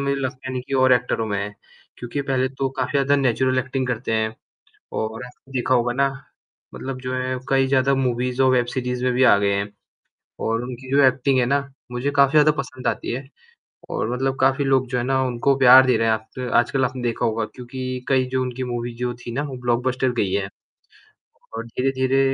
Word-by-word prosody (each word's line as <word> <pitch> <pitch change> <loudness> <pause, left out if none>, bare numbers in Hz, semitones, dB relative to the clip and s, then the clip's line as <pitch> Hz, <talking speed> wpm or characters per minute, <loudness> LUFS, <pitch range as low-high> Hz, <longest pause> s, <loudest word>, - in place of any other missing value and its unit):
मुझे 140 0 0
लगता 130 0 -4
नहीं 130 -1 -3
कि 135 - -2
और 130 -1 +5
एक्टरों 125 -2 +1
में 100 -2 -2
है। 100 +1 -4 0.4
क्योंकि 125 +4 -4
पहले 130 -1 0
तो 135 0 -2
काफ़ी 130 -2 -1
ज़्यादा 140 0 +3
नेचुरल 130 -1 +1
एक्टिंग 130 0 -2
करते 125 -1 -2
हैं 110 0 0 0.6
और 110 +3 -4 0.3
देखा 130 0 +1
होगा 120 0 +2
ना 135 +2 +2 0.7
मतलब 130 -1 -6
जो 130 0 -4
है 130 0 -2
कई 135 -1 +3
ज़्यादा 135 0 +2
मूवीज़ 125 0 0
और 130 - +5
वेब 125 -1 +2
सीरीज़ 125 -1 -2
में 125 - +2
भी 125 +2 +1
आ - - +7
गए 100 0 +1
हैं 100 +1 -1 0.8
और 115 +1 0
उनकी 130 +1 -8
जो 140 +1 +5
एक्टिंग 130 +1 +2
है 125 - +2
ना 140 +3 +2 0.3
मुझे 125 +4 -2
काफ़ी 140 -1 +4
ज़्यादा 155 0 +5
पसंद 130 -1 -7
आती - - -2
है 130 +3 -4 0.7
और - - -2
मतलब 135 +1 -1
काफ़ी 135 +2 +3
लोग 135 -1 +2
जो 125 +1 -2
है 120 - 0
ना 130 +1 +1
उनको 130 +2 +1
प्यार 130 0 +8
दे 130 - +3
रहे 115 - +1
हैं। 110 - +4
आप 110 +3 -6 0.2
आजकल 130 +2 +3
आपने 130 0 -4
देखा 120 -2 -1
होगा 115 -1 0
क्योंकि 130 0 -6
कई 130 -1 +3
जो 130 0 0
उनकी 130 0 -3
मूवी 120 -1 -4
जो 125 +1 -2
थी 120 - -5
ना 135 +5 -2
वो 140 -3 -6
ब्लॉकबस्टर 125 +2 0
गई 100 -4 +1
है 100 -1 0 1.1
और 115 - -4
धीरे-धीरे 130 +2 0
130 Hz, 210 wpm, -22 LUFS, 120-135 Hz, 1.1 s, प्यार